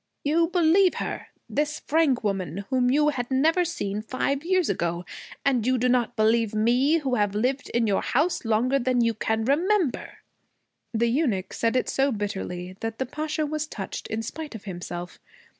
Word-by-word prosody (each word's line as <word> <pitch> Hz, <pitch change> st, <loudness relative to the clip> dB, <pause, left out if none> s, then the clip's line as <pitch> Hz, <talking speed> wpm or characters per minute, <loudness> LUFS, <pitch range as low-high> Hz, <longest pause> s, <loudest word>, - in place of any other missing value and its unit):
'You 330 Hz, +3 st, +3 dB
believe 355 Hz, +2 st, +4 dB
her, -, -, -4 dB, 0.2 s
this 300 Hz, +1 st, -1 dB
Frank 295 Hz, -6 st, +2 dB
woman 195 Hz, -2 st, -2 dB
whom 250 Hz, -1 st, +3 dB
you 295 Hz, +3 st, +4 dB
had 245 Hz, -4 st, -3 dB
never 315 Hz, +7 st, +3 dB
seen 210 Hz, -, -3 dB
five 270 Hz, +5 st, -2 dB
years 370 Hz, 0 st, +2 dB
ago, 175 Hz, -2 st, -1 dB, 0.4 s
and 260 Hz, -5 st, +2 dB
you 255 Hz, 0 st, +3 dB
do 250 Hz, +1 st, +1 dB
not 245 Hz, -1 st, +1 dB
believe 220 Hz, 0 st, +2 dB
me 245 Hz, +8 st, +3 dB
who 275 Hz, -5 st, -2 dB
have 205 Hz, -3 st, +1 dB
lived 255 Hz, +6 st, -1 dB
in 235 Hz, -1 st, +1 dB
your 200 Hz, -3 st, +1 dB
house 330 Hz, +6 st, 0 dB
longer 240 Hz, +4 st, +2 dB
than 250 Hz, -1 st, +1 dB
you 230 Hz, -1 st, +2 dB
can 220 Hz, +1 st, -1 dB
remember!' 340 Hz, -, +1 dB, 0.7 s
The 235 Hz, 0 st, +1 dB
eunuch 230 Hz, -, 0 dB
said 230 Hz, +1 st, 0 dB
it 255 Hz, -, +1 dB
so 275 Hz, +1 st, +1 dB
bitterly 190 Hz, -4 st, -4 dB
that 225 Hz, 0 st, -4 dB
the 260 Hz, -, -1 dB
Pasha 305 Hz, +3 st, -2 dB
was 305 Hz, +1 st, -3 dB
touched 195 Hz, -9 st, -6 dB
in 220 Hz, +1 st, -3 dB
spite 300 Hz, +3 st, -6 dB
of 215 Hz, -, -8 dB
himself. 175 Hz, -2 st, -7 dB
250 Hz, 175 wpm, -25 LUFS, 215-300 Hz, 0.7 s, believe